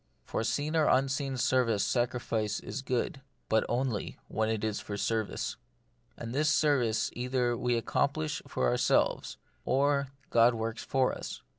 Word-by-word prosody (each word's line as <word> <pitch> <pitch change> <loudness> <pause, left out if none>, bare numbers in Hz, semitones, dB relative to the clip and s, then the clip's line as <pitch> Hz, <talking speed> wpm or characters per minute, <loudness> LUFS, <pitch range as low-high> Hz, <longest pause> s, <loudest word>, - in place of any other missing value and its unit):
For - - -2
seen 145 +7 -1
or 155 -2 +4
unseen 135 0 +1
service 120 -4 +2
sacri 125 0 0
fice 110 -3 -1
is 135 - -5
good, 130 +1 -2 0.3
but 110 0 +3
only 120 -3 -1
when 110 0 0
it 110 -1 -1
is 110 -1 -1
for 100 - -5
service. 110 0 -1 0.6
And 115 0 -6
this 150 +3 +2
service 140 -8 +2
either 125 -1 0
we 120 0 0
accomplish 80 -7 0
for 65 - 0
ourselves, - - +1 0.3
or 140 +1 +2 0.2
God 115 +1 +5
works 115 0 -3
for 130 -1 +1
us. - - -7
120 Hz, 150 wpm, -30 LUFS, 110-135 Hz, 0.6 s, God